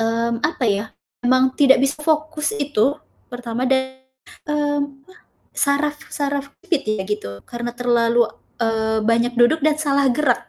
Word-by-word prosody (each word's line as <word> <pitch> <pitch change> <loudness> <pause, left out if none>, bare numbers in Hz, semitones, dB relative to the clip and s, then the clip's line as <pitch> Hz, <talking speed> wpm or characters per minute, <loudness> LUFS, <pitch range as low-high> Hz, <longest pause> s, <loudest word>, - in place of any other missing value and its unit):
mmm, 230 +1 0
apa 300 -2 -1
ya, 205 -1 +1 0.4
memang 255 +1 +3
tidak 270 -2 +5
bisa 275 +2 -1
fokus 310 +5 0
itu 280 - +1 0.3
pertama 245 0 -3
dari, 260 0 0 0.5
mmm, 290 -2 -1
apa, 370 - -19 0.4
saraf 290 +1 +1 0.2
saraf 285 -1 -1 0.2
kejepit 335 -7 0
ya 190 - -3
gitu 205 - -3
karena 240 0 -5
terlalu, 240 -1 +3 0.3
eee, 220 -1 0
banyak 235 +2 +2
duduk 240 +7 +4
dan 305 +1 +2
salah 280 -3 +2
gerak. 250 -1 +1
260 Hz, 145 wpm, -21 LUFS, 235-290 Hz, 0.5 s, tidak